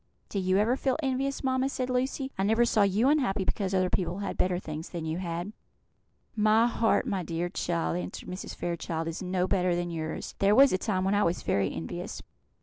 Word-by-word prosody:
"Do 200 Hz, -, -2 dB
you 185 Hz, 0 st, +2 dB
ever 220 Hz, +5 st, +3 dB
feel 265 Hz, -1 st, 0 dB
envious, 270 Hz, +1 st, -1 dB
mamma?" 260 Hz, 0 st, +1 dB
said 255 Hz, -2 st, -2 dB
Lucy. 260 Hz, +2 st, -1 dB
"I -, -, -2 dB
never 220 Hz, +4 st, +3 dB
saw 220 Hz, -, +2 dB
you 200 Hz, +5 st, +3 dB
unhappy 260 Hz, -10 st, +2 dB
because 195 Hz, -1 st, -1 dB
other 185 Hz, -1 st, +2 dB
people 180 Hz, -1 st, -1 dB
had 200 Hz, -, -3 dB
better 180 Hz, -1 st, +1 dB
things 160 Hz, -2 st, -6 dB
than 170 Hz, -3 st, -5 dB
you 160 Hz, +2 st, -2 dB
had." 175 Hz, +3 st, -4 dB, 0.8 s
"My 215 Hz, +1 st, +4 dB
heart, 230 Hz, -1 st, +2 dB
my 195 Hz, -2 st, -1 dB
dear 170 Hz, +1 st, -2 dB
child," 170 Hz, -2 st, -1 dB
answered 180 Hz, -, -6 dB
Mrs. 185 Hz, +1 st, -6 dB
Fairchild, 165 Hz, -1 st, -3 dB
"is 165 Hz, -, -4 dB
no 185 Hz, 0 st, 0 dB
better 180 Hz, -3 st, +2 dB
than 175 Hz, 0 st, -2 dB
yours. 160 Hz, -1 st, -4 dB
There 200 Hz, +1 st, +4 dB
was 270 Hz, -1 st, +7 dB
a 185 Hz, -, +1 dB
time 190 Hz, -3 st, 0 dB
when 195 Hz, +1 st, +1 dB
I 205 Hz, -, +3 dB
was 170 Hz, -2 st, 0 dB
very 100 Hz, -1 st, +1 dB
envious. 80 Hz, +2 st, -6 dB
190 Hz, 210 wpm, -28 LUFS, 175-230 Hz, 0.8 s, was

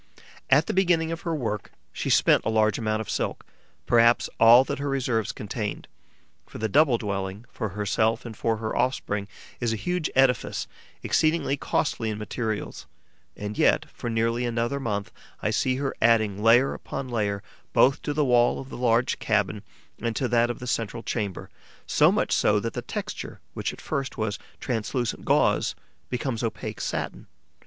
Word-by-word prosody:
At 150 Hz, +4 st, +5 dB
the -, -, -2 dB
beginning 175 Hz, -4 st, +2 dB
of 165 Hz, -, -4 dB
her 165 Hz, -2 st, -2 dB
work, 110 Hz, -7 st, -3 dB, 0.2 s
she -, -, -3 dB
spent -, -, +4 dB
a -, -, -1 dB
large 110 Hz, -1 st, +2 dB
amount 110 Hz, -1 st, 0 dB
of 110 Hz, -, -7 dB
silk, -, -, -2 dB, 0.4 s
perhaps 120 Hz, 0 st, +4 dB
all 115 Hz, +3 st, +8 dB
that 140 Hz, +1 st, -4 dB
her 140 Hz, 0 st, -2 dB
reserves 125 Hz, -6 st, 0 dB
contained; 105 Hz, 0 st, -5 dB, 0.6 s
for -, -, -10 dB
the 110 Hz, -, -1 dB
double 135 Hz, +2 st, +4 dB
dwelling 100 Hz, 0 st, -4 dB
for 110 Hz, -3 st, -3 dB
herself 110 Hz, +4 st, 0 dB
and 115 Hz, -2 st, -7 dB
for 115 Hz, +2 st, 0 dB
her 110 Hz, 0 st, -3 dB
offspring 105 Hz, -6 st, -1 dB, 0.3 s
is 120 Hz, -2 st, 0 dB
a -, -, 0 dB
huge 180 Hz, -, -1 dB
edifice, 130 Hz, -1 st, +2 dB, 0.4 s
exceedingly 155 Hz, -3 st, +2 dB
costly 120 Hz, -5 st, -1 dB
in 105 Hz, -, -3 dB
materials; 110 Hz, 0 st, -4 dB, 0.5 s
and 105 Hz, +1 st, -5 dB
yet, -, -, +4 dB
for 120 Hz, -, -5 dB
nearly 115 Hz, +1 st, 0 dB
another 120 Hz, +3 st, -1 dB
month, 105 Hz, -6 st, -3 dB, 0.3 s
I -, -, -1 dB
see 130 Hz, -, +1 dB
her 135 Hz, 0 st, -2 dB
adding 110 Hz, -3 st, +3 dB
layer 120 Hz, +4 st, +5 dB
upon 135 Hz, -1 st, -6 dB
layer 105 Hz, -4 st, -1 dB, 0.3 s
both 135 Hz, +1 st, +4 dB
to -, -, -2 dB
the 150 Hz, 0 st, +1 dB
wall 120 Hz, -2 st, +3 dB
of 135 Hz, -, -8 dB
the -, -, -7 dB
large 120 Hz, 0 st, +2 dB
cabin 105 Hz, -1 st, 0 dB, 0.4 s
and 115 Hz, -1 st, -1 dB
to 130 Hz, -, 0 dB
that 120 Hz, 0 st, +3 dB
of 120 Hz, -, -3 dB
the 125 Hz, -, -8 dB
central 115 Hz, -1 st, -2 dB
chamber, 100 Hz, -6 st, -3 dB, 0.3 s
so -, -, +4 dB
much -, -, 0 dB
so 105 Hz, 0 st, +3 dB
that 115 Hz, +2 st, -4 dB
the -, -, -3 dB
texture, -, -, -6 dB
which -, -, -2 dB
at -, -, -12 dB
first 135 Hz, -1 st, -3 dB
was 110 Hz, -2 st, -2 dB, 0.2 s
translucent 120 Hz, +1 st, -2 dB
gauze, -, -, +2 dB, 0.3 s
becomes 125 Hz, -2 st, -2 dB
opaque 115 Hz, -2 st, -4 dB
satin. -, -, -4 dB
115 Hz, 175 wpm, -26 LUFS, 110-130 Hz, 0.6 s, all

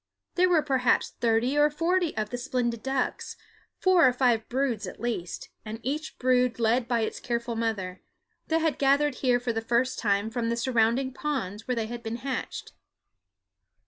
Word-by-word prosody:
There 365 Hz, 0 st, +3 dB
were 330 Hz, -4 st, +4 dB
perhaps 260 Hz, -4 st, +2 dB
thirty 235 Hz, +3 st, +2 dB
or 295 Hz, 0 st, +5 dB
forty 335 Hz, 0 st, 0 dB
of 215 Hz, -1 st, -2 dB
the 245 Hz, -, -2 dB
splendid 245 Hz, -3 st, -1 dB
birds 265 Hz, +1 st, -2 dB, 0.4 s
four 365 Hz, -6 st, +5 dB
or -, -, +4 dB
five 245 Hz, -3 st, +1 dB
broods 250 Hz, -4 st, -1 dB
at -, -, -9 dB
least, 225 Hz, -8 st, -4 dB
and 220 Hz, +1 st, -6 dB
each 300 Hz, +4 st, -3 dB
brood 250 Hz, -1 st, +2 dB
led 235 Hz, +1 st, +2 dB
by 235 Hz, -1 st, +1 dB
its 220 Hz, -, -2 dB
careful 235 Hz, -1 st, -2 dB
mother 210 Hz, -5 st, -2 dB, 0.5 s
that 325 Hz, 0 st, +1 dB
had 320 Hz, -2 st, 0 dB
gathered 280 Hz, +1 st, +3 dB
here 250 Hz, -2 st, +3 dB
for 245 Hz, -1 st, -2 dB
the 225 Hz, -, -2 dB
first 235 Hz, +3 st, 0 dB
time 205 Hz, 0 st, +1 dB
from 230 Hz, -1 st, -1 dB
the 235 Hz, -, -1 dB
surrounding 240 Hz, +2 st, +1 dB
ponds 260 Hz, -, -3 dB
where 250 Hz, -, 0 dB
they 225 Hz, -1 st, -1 dB
had 235 Hz, +1 st, -6 dB
been 225 Hz, 0 st, -4 dB
hatched. 255 Hz, +1 st, -5 dB
245 Hz, 175 wpm, -27 LUFS, 230-275 Hz, 0.5 s, or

